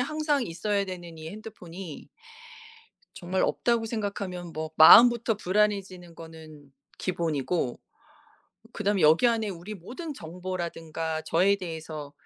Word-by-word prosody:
항상 300 0 0
있어야 200 +4 -1
되는 175 -3 -8
이 160 0 -8
핸드폰이 195 -6 -10 1.1
정말 185 +2 -2
없다고 235 -2 +1
생각하면 200 -6 -4
뭐 155 0 -5
마음부터 235 +6 +8
불안해지는 195 -3 -1
거는 155 -3 -13 0.3
기본이고 165 -6 -2 0.9
그다음에 205 -1 0
여기 160 +10 +5
안에 225 -3 +1
우리 190 +3 -7
모든 260 - -7
정보라든가 165 - -5
저에 190 +6 +2
대해서 160 -5 -7
180 Hz, 290 characters per minute, -27 LUFS, 165-210 Hz, 1.1 s, 마음부터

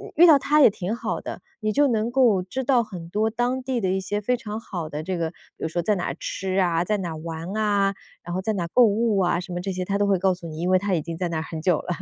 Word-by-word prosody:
遇 345 - +8
到 310 -4 +8
他 300 +2 +3
也 270 - +9
挺 200 +1 -3
好 - - -3
的， - - -7 0.2
你 215 0 0
就 285 +6 +4
能 230 -2 0
够 240 -7 +4
知 260 +9 -4
道 245 -2 +3
很 180 -6 -9
多 215 +4 +1
当 245 +3 -1
地 255 -1 -1
的 190 - 0
一 190 +1 +1
些 205 +2 -2
非 250 +4 +1
常 215 -2 -5
好 175 -7 -5
的 150 0 -4
这 185 +2 -2
个 165 -1 -2
比 - - -27 0.3
如 - - +1
说 175 +2 -1
在 210 +3 +1
哪 180 - -3
儿 - - -3
吃 190 0 -2
啊、 170 -2 +2
在 210 +4 0
哪 185 -3 -3
儿 160 - -6
玩 165 +2 -6
啊， 205 -2 +2 0.3
然 175 - -6
后 185 - -1
在 220 +3 -1
哪 190 -4 -2
儿 - - -8
购 250 - +7
物 220 0 +2
啊， 175 -2 +2
什 180 0 -7
么 175 - -2
这 195 +2 -3
些 185 0 -3
他 200 +2 0
都 205 - +2
会 195 -1 +3
告 190 +1 +3
诉 175 -1 -10
你， 155 -1 -7
因 175 +2 -1
为 185 - +5
他 200 0 -1
已 165 - +1
经 165 +1 -6
在 180 0 -2
那 165 - -2
儿 - - -1
很 160 -1 -6
久 175 -1 +3
了。 - - -10
195 Hz, 340 characters per minute, -24 LUFS, 175-220 Hz, 0.3 s, 也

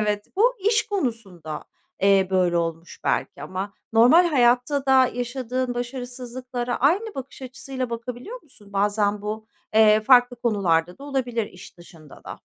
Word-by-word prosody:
Evet. 210 -1 -1
Bu - - +4
iş 445 -1 +2
konusunda, 210 - -4 0.4
eee, 195 -1 +4
böyle 180 -2 +2
olmuş 165 0 -4
belki 140 - -1
ama 190 +5 -5 0.2
normal 250 +11 +6
hayatta 265 -1 +2
da 260 -1 +5
yaşadığın 245 0 -3
başarısızlıklara 245 0 -5
aynı 385 - +1
bakış 270 0 -8
açısıyla 260 -1 -6
bakabiliyor 250 - -7
musun? 210 -9 -19
Bazen 205 0 0
bu, 215 +1 -5 0.3
eee, 215 -1 +6
farklı 245 +1 +5
konularda 180 -7 0
da 280 - -10
olabilir 245 -6 -2
iş 180 -1 -14
dışında 165 -4 -16
da. - - -8
240 Hz, 140 wpm, -23 LUFS, 200-260 Hz, 0.4 s, normal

